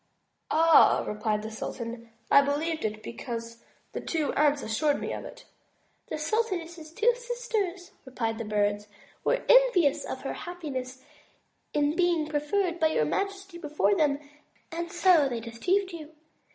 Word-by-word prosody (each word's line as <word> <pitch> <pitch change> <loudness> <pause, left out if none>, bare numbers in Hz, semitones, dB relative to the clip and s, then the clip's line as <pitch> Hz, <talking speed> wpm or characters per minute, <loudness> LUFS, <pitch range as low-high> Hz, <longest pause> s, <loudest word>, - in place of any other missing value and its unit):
"Ah!" 325 0 +6
replied 210 0 -1
the 220 - -6
sultan, 230 +1 -6 0.2
"I 280 - +8
believed 310 +3 -1
it, 215 0 -3
because 230 -1 -6 0.3
the - - -5
two 315 -3 -1
aunts 295 -1 +2
assured 285 +7 +1
me - - -3
of - - -6
it." - - -11 0.6
"The - - -4
sultaness's 340 -3 -2
two 450 +8 +3
sisters," 465 -7 -3
replied 230 -4 -3
the - - -2
Bird, 205 0 0 0.4
"were - - +1
envious 485 - +5
of - - -5
her - - -4
happiness 265 -7 -6 0.7
in 295 +1 +1
being 345 -3 +2
preferred 335 +4 -1
by 320 - +4
your 310 - +1
majesty 390 - -3
before 300 +5 +1
them> 300 -6 +2 0.5
and 340 +1 -4
so 345 -5 +4
they 240 -2 -3
deceived 360 - -1
you. 320 -3 -9
310 Hz, 145 wpm, -28 LUFS, 240-355 Hz, 0.7 s, I